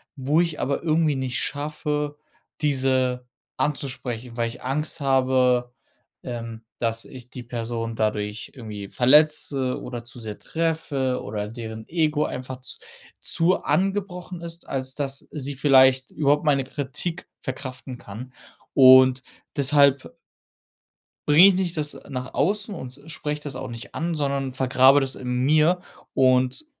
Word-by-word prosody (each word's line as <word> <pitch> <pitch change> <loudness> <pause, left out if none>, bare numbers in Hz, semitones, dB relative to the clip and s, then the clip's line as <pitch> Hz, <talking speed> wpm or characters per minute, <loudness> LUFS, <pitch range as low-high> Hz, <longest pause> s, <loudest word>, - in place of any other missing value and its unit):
wo 145 +4 +2
ich 165 -3 -2
aber 140 +3 -1
irgendwie 155 -2 +2
nicht 130 -1 -2
schaffe, 150 0 -2 0.4
diese 130 -3 +1 0.3
anzusprechen, 125 -5 -3
weil 115 -1 0
ich 120 - -10
Angst 150 +5 -2
habe, 130 -2 +2 0.5
ähm, 115 -2 -6 0.2
dass 115 -1 0
ich 125 -1 -12
die 125 - -7
Person 115 -1 -4
dadurch 105 -1 -2
irgendwie 105 -5 -7
verletze 140 0 +3
oder 120 -2 -6
zu 120 +1 -10
sehr 110 -2 -7
treffe 155 -6 -1
oder 105 0 -4
deren 110 -1 -8
Ego 155 -2 +1
einfach 130 0 -6
z 130 - -4 0.4
zu 175 +3 +2
angebrochen 185 -2 -1
ist, 170 0 -8
als 130 -1 -2
dass 135 -2 -2
sie 145 -1 -4
vielleicht 130 -1 +5
überhaupt 145 -1 +2
meine 140 -3 +3
Kritik 145 +6 -5
verkraften 130 -1 -6
kann. 120 +4 -9 0.4
Und 130 -1 +7 0.3
deshalb 140 -1 +3 1.1
bringe 155 +6 +9
ich 195 - +4
nicht 180 -2 -1
das 150 -1 -4
nach 130 -2 -6
außen 205 +3 0
und 130 -4 -8
spreche 150 -2 -4
das 145 -2 -6
auch 130 - -5
nicht 115 0 -9
an, 170 +1 -2
sondern 140 -3 -1
vergrabe 130 +2 +5
das 135 -1 -1
in 125 - -7 0.2
mir. 155 +5 +4 0.3
Und, 130 - +2
135 Hz, 135 wpm, -24 LUFS, 125-150 Hz, 1.1 s, bringe